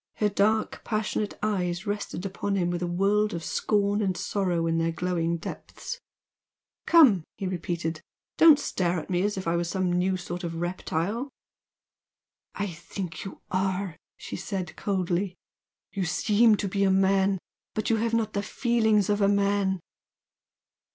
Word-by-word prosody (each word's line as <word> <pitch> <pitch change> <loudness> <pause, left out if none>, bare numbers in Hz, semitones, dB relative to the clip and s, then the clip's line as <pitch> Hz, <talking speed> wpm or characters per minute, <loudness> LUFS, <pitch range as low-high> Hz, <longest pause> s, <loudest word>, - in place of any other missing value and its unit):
Her 210 - +2
dark, 215 +2 +1
passionate 215 -1 -2
eyes 180 -3 -1
rested 205 -2 -3
upon 195 +1 -2
him 175 -2 +1
with 175 0 -2
a 175 - -1
world 200 +3 +2
of 165 - -5
scorn 205 +2 +1
and 190 -3 0
sorrow 180 -5 0
in 165 0 +1
their 165 0 +1
glowing 170 -1 -1
depths. 485 - -7 0.9
"Come!" 265 - +7
he 195 - -4
repeated 170 -3 -3 0.4
"Don't 320 -3 +9
stare 180 - 0
at 160 - -8
me 180 0 +2
as 205 +1 0
if 185 - -4
I 165 - +2
were 170 - +1
some 180 +1 -1
new 185 +1 +1
sort 175 0 -6
of 165 -1 -3
reptile!" 180 - -2 1.3
"I 205 - -1
think 175 -1 -6
you 195 - -8
are!" 190 -1 -1 0.2
she - - -7
said, 185 -5 -4
coldly 185 -1 -1 0.6
"You 195 -3 -1
seem 215 +5 +4
to 200 - -2
be 195 +1 0
a 195 - +4
man, 190 0 +3 0.4
but 215 0 0
you 225 - +3
have 230 +1 0
not 220 -2 0
the 200 - 0
feelings 220 -2 +2
of 205 0 +1
a 200 - +5
man!" 200 -1 +2
195 Hz, 160 wpm, -27 LUFS, 175-205 Hz, 1.3 s, Don't